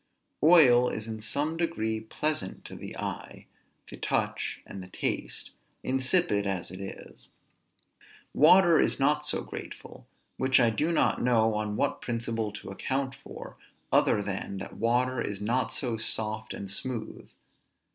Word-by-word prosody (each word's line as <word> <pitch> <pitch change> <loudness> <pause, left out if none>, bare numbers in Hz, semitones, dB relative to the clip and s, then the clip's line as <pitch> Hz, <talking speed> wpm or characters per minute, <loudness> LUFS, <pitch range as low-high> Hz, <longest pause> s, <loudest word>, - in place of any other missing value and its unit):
Oil 135 -7 +7
is 110 0 -5
in 110 -1 -5
some 145 +9 -1
degree 110 -11 -1
pleasant 110 -1 -2
to - - -9
the - - -8
eye, - - -6 0.4
the - - -10
touch, - - -2
and 100 - -8
the 90 - -9
taste, 90 - -3 0.3
insipid 130 - +2
as 95 -3 -3
it 95 - -8
is. 95 - -10 1.1
Water 170 +2 +6
is - - +2
not 150 +2 +2
so - - +3
grateful; - - -9 0.3
which 130 0 +3
I 120 -2 +4
do 150 +10 0
not 165 - +2
know 115 -3 +3
on 105 0 -2
what - - -1
principle 115 -2 -2
to 100 -1 -9
account 135 +6 -2
for, 135 0 -11 0.3
other 105 - +3
than 100 0 -4
that - - -7
water 125 +2 +1
is 100 -1 -3
not 115 +2 0
so 120 -5 -1
soft 110 -1 -1
and 100 - -6
smooth. 110 +3 -4
115 Hz, 145 wpm, -28 LUFS, 105-135 Hz, 1.1 s, Oil